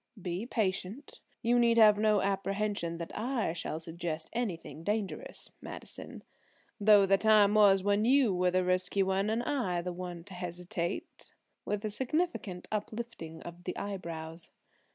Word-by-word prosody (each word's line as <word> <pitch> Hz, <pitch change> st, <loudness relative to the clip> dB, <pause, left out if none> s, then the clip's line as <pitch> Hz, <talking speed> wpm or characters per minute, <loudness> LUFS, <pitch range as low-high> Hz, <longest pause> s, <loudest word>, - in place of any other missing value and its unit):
"Be 180 Hz, +4 st, -4 dB
patient. 210 Hz, +4 st, -2 dB, 0.2 s
You 240 Hz, +1 st, +3 dB
need 235 Hz, -1 st, +4 dB
have 210 Hz, -2 st, +7 dB
no 210 Hz, -2 st, +3 dB
apprehension 195 Hz, -3 st, -1 dB
that 170 Hz, 0 st, -7 dB
I 230 Hz, -6 st, -1 dB
shall 160 Hz, -2 st, -4 dB
suggest 165 Hz, -1 st, -4 dB
anything 190 Hz, -9 st, -4 dB
dangerous, 210 Hz, -, -3 dB
Madison; -, -, -8 dB, 0.6 s
though 205 Hz, -1 st, +7 dB
the 195 Hz, 0 st, +3 dB
time 210 Hz, -1 st, +5 dB
was 200 Hz, -3 st, +6 dB
when 205 Hz, +1 st, +2 dB
you 255 Hz, -3 st, +4 dB
were 180 Hz, 0 st, +2 dB
the 185 Hz, +1 st, +2 dB
risky 185 Hz, +2 st, +1 dB
one 190 Hz, +2 st, +1 dB
and 225 Hz, +2 st, 0 dB
I 215 Hz, -12 st, -1 dB
the 180 Hz, 0 st, -3 dB
one 175 Hz, -1 st, -6 dB
to 190 Hz, +2 st, -11 dB
hesitate," 180 Hz, +1 st, -5 dB, 0.3 s
with 210 Hz, +1 st, -2 dB
a 215 Hz, -, -1 dB
significant 260 Hz, -, -2 dB
uplifting 215 Hz, -6 st, -5 dB
of 175 Hz, +1 st, -10 dB
the 180 Hz, -, -4 dB
eyebrows. 165 Hz, -4 st, -5 dB
195 Hz, 150 wpm, -31 LUFS, 180-215 Hz, 0.6 s, have